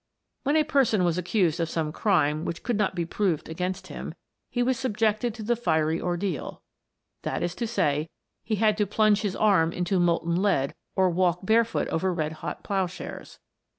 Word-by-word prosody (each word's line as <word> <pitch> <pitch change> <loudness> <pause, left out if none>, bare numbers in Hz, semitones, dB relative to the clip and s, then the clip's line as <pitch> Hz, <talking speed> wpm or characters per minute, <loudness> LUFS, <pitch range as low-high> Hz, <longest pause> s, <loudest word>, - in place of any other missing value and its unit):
When 285 +2 +1
a 310 - +5
person 270 -10 +2
was 175 0 +1
accused 180 -2 +1
of 165 -1 0
some 160 -2 -1
crime 155 -5 +1
which 170 - -4
could 240 - 0
not 205 -2 0
be 170 -2 -1
proved 175 -2 -1
against 180 +3 -3
him, - - -7 0.3
he 245 - 0
was 260 +1 +1
subjected 220 -2 0
to 225 - -7
the 240 +3 +1
fiery 160 -8 +1
ordeal, 175 -3 -3 0.6
that - - -2
is 175 0 -1
to 235 +5 -3
say, 155 -8 0 0.3
he 220 - -1
had 215 0 +2
to 210 - +2
plunge 210 0 +3
his 200 -3 -2
arm 190 -6 +3
into 180 +2 0
molten 170 0 +1
lead 140 -10 +1 0.2
or 190 -1 +3
walk 175 0 +1
barefooted 230 +2 +2
over 185 +3 0
red 155 -3 -1
hot - - -5
ploughshares. 190 -2 -4
190 Hz, 185 wpm, -26 LUFS, 170-215 Hz, 0.6 s, a